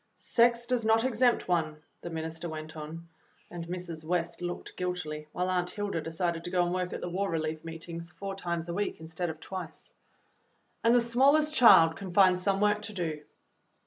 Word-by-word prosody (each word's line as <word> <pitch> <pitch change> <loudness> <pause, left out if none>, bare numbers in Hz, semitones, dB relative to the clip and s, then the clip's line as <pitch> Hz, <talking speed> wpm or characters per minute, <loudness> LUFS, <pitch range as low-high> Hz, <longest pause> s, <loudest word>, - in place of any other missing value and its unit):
"Sex 235 0 +2
does 245 -1 0
not 225 +1 +4
exempt 250 -1 +2
one," 160 -4 0 0.2
the 175 - -6
minister 160 +1 -4
went 155 0 -7
on, 160 +2 -8 0.4
and 170 -1 -6
Mrs. 175 -3 -5
West 170 0 -2
looked 175 0 -5
guilty, 170 -4 -4
while 180 0 -1
Aunt 180 -1 +1
Hilda 205 -5 -3
de 165 - -6
cided 170 0 -1
to 175 - -5
go 180 -1 +2
and 175 - -1
work 180 -1 -1
at - - -5
the - - -3
War 195 +3 -1
Relief 155 -1 -2
meetings 165 +1 -7
four 195 +1 -6
times 170 -3 -3
a 170 - -3
week 205 +3 -2
instead 160 +2 -4
of 160 0 -6
twice. 185 0 -8 0.9
"And 230 +1 +5
the 245 - +5
smallest 280 +6 +3
child 185 - +7
can 190 -3 -7
find 185 -2 +6
some 195 +1 +1
work 210 0 +3
to - - -9
do." 160 -5 -3
175 Hz, 195 wpm, -29 LUFS, 165-200 Hz, 0.9 s, child